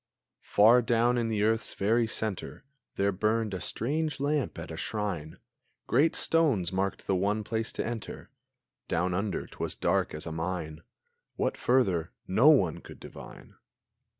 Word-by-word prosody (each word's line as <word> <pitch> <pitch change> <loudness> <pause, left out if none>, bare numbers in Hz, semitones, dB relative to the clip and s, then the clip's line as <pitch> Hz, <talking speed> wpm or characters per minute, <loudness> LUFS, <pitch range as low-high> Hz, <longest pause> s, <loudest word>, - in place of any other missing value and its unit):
Far 115 +4 +6
down 120 +1 +2
in 115 - 0
the 110 -2 0
earth's 110 0 0
very 115 +4 +2
centre 110 +1 -4 0.3
There 100 +1 +1
burned 110 +2 0
a 95 - -4
strange 150 +4 -1
lamp 145 0 -1
at - - -7
a - - -5
shrine; 95 -8 -4 0.5
Great 160 +4 +3
stones 130 - +2
marked 95 +1 -2
the 95 - +1
one 100 +3 0
place 110 +2 -2
to - - -3
enter; 115 -2 -6 0.6
Down 90 +2 0
under 95 +1 -2
t'was - - -5
dark - - 0
as 75 - -6
a 80 - -5
mine; 80 -1 -4 0.5
What - - -1
further 95 -10 +1
no 110 +11 +5
one 95 - +4
could - - -13
divine! - - -12
105 Hz, 150 wpm, -29 LUFS, 95-120 Hz, 0.6 s, Far